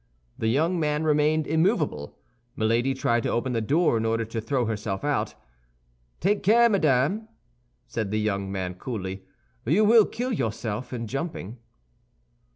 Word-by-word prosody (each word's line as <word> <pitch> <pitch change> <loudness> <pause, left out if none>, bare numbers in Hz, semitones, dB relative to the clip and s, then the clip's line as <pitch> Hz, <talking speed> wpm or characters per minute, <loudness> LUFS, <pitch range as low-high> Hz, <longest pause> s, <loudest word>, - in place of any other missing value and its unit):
The 110 - -2
young 160 +9 +1
man 150 0 0
remained 155 0 +2
immovable. 160 - 0 0.4
Milady 115 +4 +1
tried 120 -2 +1
to - - -2
open 125 +2 -1
the 115 - 0
door 145 +3 +2
in - - -2
order 115 0 0
to 115 +1 -4
throw 125 +2 0
herself 105 -3 -3
out. 145 -1 -1 0.8
"Take 200 +4 +1
care, 235 +4 +5
madame," 185 - +2 0.6
said 110 -3 -3
the 110 +1 0
young 100 -2 -1
man, 95 -2 -3
coolly, 95 -2 -5 0.4
"you 175 - +3
will 220 0 +7
kill 245 +2 -3
yourself 115 - -3
in 120 -2 -4
jumping." 125 - -5
125 Hz, 150 wpm, -26 LUFS, 110-160 Hz, 0.8 s, will